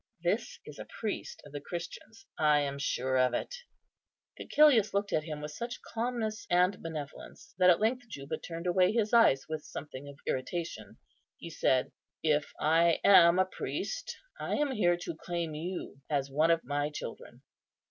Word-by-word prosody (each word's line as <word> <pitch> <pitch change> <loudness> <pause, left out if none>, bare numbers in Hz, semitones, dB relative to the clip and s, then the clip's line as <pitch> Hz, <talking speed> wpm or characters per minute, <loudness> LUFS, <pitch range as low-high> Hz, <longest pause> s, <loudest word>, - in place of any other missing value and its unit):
This - - -1
is - - -11
a - - -7
priest 215 -3 -4
of 145 - -13
the 145 0 -6
Christians. 180 +8 -8
I 150 -1 +4
am 140 -1 -3
sure 130 -1 0
of 125 -1 +3
it." - - -3 0.9
Cæcilius 250 -9 +4
looked 200 0 0
at 155 - +1
him 150 -2 -5
with 150 0 -5
such 235 +9 -5
calmness 225 -2 -2
and 180 +2 +3
benevolence, 160 +5 -8
that 180 0 +6
at 175 - +5
length 245 +3 0
Juba 140 -5 -5
turned 170 0 -7
away 180 +1 +3
his 220 -1 0
eyes 225 - +5
with 155 -1 -4
something 140 -1 -8
of 140 - -12
irritation. 130 - -4 0.4
He 170 - -9
said, 130 -4 +1 0.3
"If 150 -2 +1
I 165 +2 +3
am 175 -3 +7
a 185 - +4
priest, 335 - -4 0.2
I - - -2
am 295 -2 +1
here 175 -8 +2
to 170 -1 -6
claim 170 -1 -4
you 160 -2 -6
as 140 -2 -1
one 155 +4 +3
of 165 0 +3
my 145 +2 -1
children." 150 - -8
170 Hz, 170 wpm, -31 LUFS, 145-200 Hz, 0.9 s, am